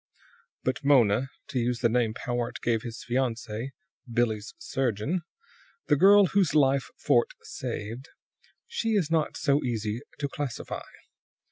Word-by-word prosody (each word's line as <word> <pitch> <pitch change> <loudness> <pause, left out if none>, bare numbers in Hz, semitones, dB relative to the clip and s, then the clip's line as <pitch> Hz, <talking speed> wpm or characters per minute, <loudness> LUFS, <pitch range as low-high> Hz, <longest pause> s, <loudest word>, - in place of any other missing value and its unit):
"But 130 +1 -1
Mona 130 -3 +4 0.2
to 130 - -1
use 120 0 0
the 120 - +5
name 115 -1 +1
Powart 120 -1 -3
gave 115 -2 +1
his 115 -1 -7
fiancee 120 -1 -2 0.4
Billie's 115 -2 0
surgeon 135 - -1 0.7
the - - +6
girl 200 +6 +7
whose 185 -5 +2
life 135 -2 +3
Fort 465 - +3 0.2
saved 125 - -5 0.6
she 235 - -1
is 180 -7 +1
not 160 -2 +1
so 140 +1 +2
easy 115 -2 -2 0.2
to 145 - -1
classify. 140 -3 -4
125 Hz, 130 wpm, -28 LUFS, 115-145 Hz, 0.7 s, girl